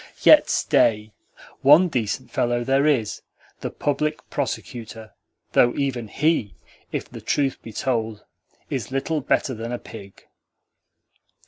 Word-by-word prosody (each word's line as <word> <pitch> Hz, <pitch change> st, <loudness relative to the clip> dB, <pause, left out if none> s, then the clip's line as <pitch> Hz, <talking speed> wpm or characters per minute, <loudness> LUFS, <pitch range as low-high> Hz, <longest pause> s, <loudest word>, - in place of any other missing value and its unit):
Yet -, -, +7 dB
stay: 105 Hz, -1 st, +2 dB, 0.5 s
ONE 150 Hz, +7 st, +7 dB
decent 125 Hz, -1 st, -3 dB
fellow 120 Hz, 0 st, 0 dB
there 135 Hz, +3 st, +2 dB
is 125 Hz, -8 st, 0 dB, 0.4 s
the -, -, -4 dB
Public 150 Hz, +2 st, -2 dB
Prosecutor; 110 Hz, -2 st, -5 dB, 0.4 s
though 120 Hz, -, +4 dB
even 130 Hz, -5 st, -2 dB
HE, 120 Hz, -, 0 dB, 0.4 s
if -, -, -3 dB
the -, -, -10 dB
truth 140 Hz, -2 st, 0 dB
be 115 Hz, -, -10 dB
told, 110 Hz, -3 st, -2 dB, 0.5 s
is -, -, -3 dB
little 145 Hz, +3 st, -1 dB
better 130 Hz, 0 st, 0 dB
than 115 Hz, +1 st, -6 dB
a 120 Hz, -, -2 dB
pig." 100 Hz, -5 st, -12 dB
120 Hz, 125 wpm, -23 LUFS, 110-140 Hz, 0.5 s, Yet